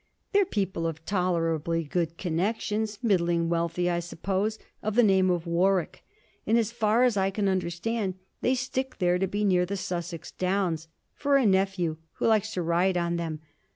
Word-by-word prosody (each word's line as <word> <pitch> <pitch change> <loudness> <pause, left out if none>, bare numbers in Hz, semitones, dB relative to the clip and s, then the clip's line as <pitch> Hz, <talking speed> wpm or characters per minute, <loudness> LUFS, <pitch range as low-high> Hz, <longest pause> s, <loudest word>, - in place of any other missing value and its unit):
They're 405 -1 +4
people 190 - -1
of 160 0 -6
tolerably 165 -3 0
good 165 +2 -2
connections, 210 +4 -1
middling 170 -6 +2
wealthy, 170 +1 0
I 175 -1 +1
suppose, 190 +5 -2 0.2
of 215 0 -2
the 245 - +6
name 190 -3 +4
of 175 -1 0
Warwick, 175 +1 +1 0.4
and, 225 - +4
as 225 -2 +1
far 230 0 +2
as 245 -5 +3
I 190 0 +2
can 200 +1 -1
understand, 190 +3 -1 0.3
they 255 - +2
stick 260 +1 -3
there 180 -1 +2
to 190 - +1
be 205 +3 -2
near 180 -2 +3
the 200 +3 -3
Sussex 175 -3 -5
Downs, 180 -4 -1 0.3
for 280 -1 +2
a 265 - +2
nephew, 190 -5 +1 0.2
who - - -3
likes 220 -1 +3
to 180 - -1
ride 175 +3 +2
on 170 0 0
them. 160 -2 -4
185 Hz, 175 wpm, -27 LUFS, 170-210 Hz, 0.4 s, the